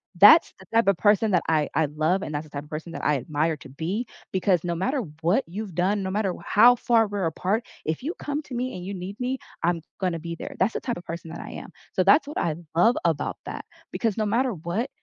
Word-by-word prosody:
That's - - +8
the - - -14
type 230 -2 +4
of 195 - +2
person 210 0 +3
that 180 - +3
I 155 -2 +2
I 160 - +3
love 155 +6 0
and 150 -6 -4
that's 150 +1 -3
the - - -16
type 140 0 -6
of - - -19
person 155 +2 -6
that - - -5
I 150 - +3
admire 155 +5 -1
to 135 - -13
be, 185 - -3 0.3
because 185 -2 +2
no 170 -1 -1
matter 260 - 0 0.2
what 190 +11 +3
you've 195 +1 -6
done, 195 +3 +1
no 190 - -2
matter 200 -3 0
how 235 +3 +7
far 230 -2 +3
we're 200 -2 -2
apart, 185 +7 0 0.2
if 160 +8 -2
you 320 +5 -2
come 290 +1 -2
to 265 - -11
me 250 +1 -2
and 180 - -6
you 200 - -4
need 190 +2 -6
me, 260 +2 -1 0.3
I'm 170 -1 +1 0.2
gonna 180 -3 0
be 170 +1 -5
there. - - -7
That's 195 +4 +2
the - - -3
type 240 -6 -2
of 175 - -10
person 165 0 -6
that 170 - -7
I - - -8
am. - - -8 0.2
So, 185 - +2
that's 280 - +5
what 295 - -6
I 155 -2 0 0.2
love 225 +8 +4
about 160 -3 0
that, - - -6 0.3
because 225 -3 0
no 215 - +1
matter 235 +4 +1
what, 180 - -3
190 Hz, 255 wpm, -25 LUFS, 165-225 Hz, 0.3 s, That's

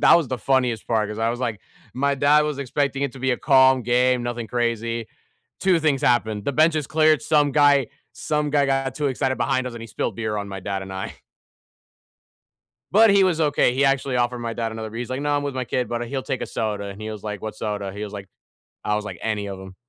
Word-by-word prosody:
That - - +7
was 165 -6 0
the 130 - -3
funniest 125 -3 0
part, 110 -2 +1
'cause 105 0 -6
I 115 +1 +1
was 120 +1 -5
like, 115 -5 -2 0.3
my 140 +2 +1
dad 145 +2 +4
was 150 -2 -3
expecting 140 0 -1
it 140 -3 -1
to 135 - -11
be 130 +1 0
a 125 - -1
calm 130 -2 +4
game, 125 +1 +2
nothing 120 -1 -4
crazy. 115 -1 -2 0.5
2 185 -3 +3
things 150 -4 +1
happened, 110 -4 +1
the 140 - -1
benches 155 0 +2
cleared, 155 0 +3
some 150 -2 +3
guy 145 -3 +4 0.2
some 150 -1 -1
guy 145 -1 +3
got 135 -1 0
too 150 - -1
excited 130 0 -1
behind 130 +2 0
us, 125 - -5
and 115 - -8
he 115 - -7
spilled 105 -1 -3
beer 110 -2 -2
on 100 -1 -4
my 95 -1 -6
dad 95 0 -3
and 95 0 -8
I. 95 0 -5 1.8
But 220 +2 +6
he 200 0 +5
was 180 -4 +2
okay; 145 -5 +2
he 135 +2 +2
actually 135 -1 +1
offered 120 0 0
my 115 -1 -4
dad 115 -1 -3
another 110 0 -5
bee 115 - -7
He's 125 +1 -5
like, 130 - -2
"No, 145 0 0
I'm 145 - -1
with 140 -2 -3
my 130 -1 -2
kid, 125 +1 -2
but 120 0 -3
he'll 135 +2 -3
take 130 - -3
a - - -3
soda," 105 -2 -3
and 100 +1 -8
he 110 0 -5
was 105 -2 -8
like, 105 -2 -5
"What 110 0 -5
soda?" 105 -2 -4
He 105 +2 -7
was 105 - -6
like 100 -2 -8 0.6
"I 105 - 0
was 105 0 -3
like, 95 -4 -6
any 105 -2 -2
of 100 -1 -6
them." 95 0 -11
125 Hz, 250 wpm, -23 LUFS, 110-140 Hz, 1.8 s, That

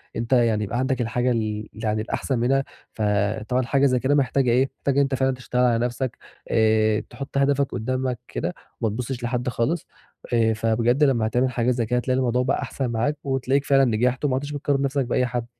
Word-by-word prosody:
أنت 115 +3 -1
يعني 115 -4 +3
يبقى 110 +4 -2
عندك 130 -1 0
الحاجة 120 +2 0
ال 110 -2 -2
يعني 110 -1 -2
الأحسن 120 +3 -2
منها، 135 +3 +2 0.3
فطبعًا 105 +3 0
حاجة 140 +2 +2
زي 130 -2 +3
كده 135 +4 +2
محتاجة 135 -2 +2
إيه؟ 130 +3 +3
محتاجة 140 - -1
إن 140 - +4
أنت 135 -1 +1
فعلًا 130 0 +1
تشتغل 125 -1 -2
على 120 -1 +2
نَفْسك، 125 +1 -3 0.3
آآ، 110 -1 +3
تحط 140 +3 -6
هدفك 140 0 +2
قُدّامك 130 +1 -2
كده 180 - -3 0.3
وما 115 - +1
تبُصّش 125 +1 -4
لحد 125 +1 -1
خالص، 145 +8 -1 0.5
آآ، 115 -1 +3
فبجد 115 +5 +1
لمّا 120 -6 +3
هتعمل 125 +3 +1
حاجة 120 0 +1
زي 120 -2 0
كده 125 +3 0
هتلاقي 130 +1 0
الموضوع 125 -1 +1
بقى 130 - 0
أحسن 130 -3 -3
معاك 125 +7 0
وتلاقيك 135 0 0
فعلًا 135 -1 +4
نجحت 125 +3 +1
وما 135 -3 +1
عدتش 145 +2 -3
بتقارن 145 -1 0
نَفْسك 140 -1 0
بأي 125 +1 +1
حد. 120 -1 -3
125 Hz, 200 wpm, -23 LUFS, 115-135 Hz, 0.5 s, إن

